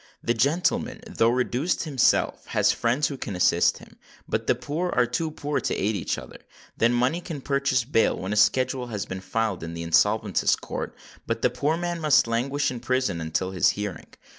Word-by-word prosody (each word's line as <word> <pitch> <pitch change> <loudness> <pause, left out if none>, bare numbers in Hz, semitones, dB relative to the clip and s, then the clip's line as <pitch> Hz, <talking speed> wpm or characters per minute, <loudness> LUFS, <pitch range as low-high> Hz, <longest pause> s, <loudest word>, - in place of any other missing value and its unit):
The 120 - +1
gentleman, 180 - 0
though 155 - +2
reduced 125 +6 0
himself, 140 -7 +1
has - - +2
friends 125 +6 +1
who 140 - -5
can 105 -6 -5
assist 90 - +3
him; - - -16 0.3
but - - -2
the - - +3
poor 165 +5 -3
are 125 -7 +2
too 125 +7 -2
poor 145 -1 -2
to - - -2
aid 105 +2 0
each 95 - -2
other. - - -10 0.4
Then 115 +1 +3
money 125 +8 +1
can 165 -4 -6
purchase 140 -2 +1
bail 115 -2 +2
when 95 +3 -3
a - - -1
schedule 130 +3 +2
has 105 -5 -4
been 95 0 -6
filed 110 -1 -2
in 85 0 -6
the 85 - -5
Insolvents' 100 +3 +2
Court; - - -6 0.3
but - - -2
the - - +3
poor 155 +3 0
man 175 0 -3
must 150 -3 +5
languish 130 +5 0
in 125 - -5
prison 125 -8 -1
until 80 +4 -2
his 95 - +3
hearing. 105 -4 -5
125 Hz, 195 wpm, -25 LUFS, 105-145 Hz, 0.4 s, must